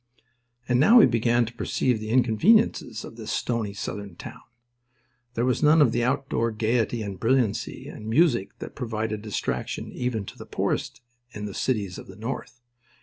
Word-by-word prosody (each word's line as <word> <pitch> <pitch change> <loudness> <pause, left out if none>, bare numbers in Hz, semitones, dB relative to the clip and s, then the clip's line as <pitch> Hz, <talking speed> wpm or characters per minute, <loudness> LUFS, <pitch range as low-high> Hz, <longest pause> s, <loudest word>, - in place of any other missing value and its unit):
And 125 0 +2
now 225 - +7
he - - +9
began 120 0 +2
to 115 - -8
perceive 120 +1 0
the 110 0 -6
inconveniences 125 - +3
of 115 - -11
this 110 -1 -6
stony 110 -4 -2
Southern 100 -2 -6
town. - - -10 0.9
There 120 - +1
was 125 -1 +1
none 155 +2 +5
of 140 -6 +5
the 120 - 0
outdoor 125 -2 0
gaiety 115 +1 0
and 100 -2 -6
brilliancy 115 -3 0
and 110 - -9
music 120 - +2
that - - -8
provided 110 -4 -3
distraction 105 -1 -3
even 120 -5 -2
to - - -11
the - - -9
poorest - - -2 0.3
in 105 0 -5
the 100 - -6
cities 100 -8 -2
of - - -11
the 95 - -11
North. 115 +2 -6
115 Hz, 170 wpm, -25 LUFS, 110-125 Hz, 0.9 s, he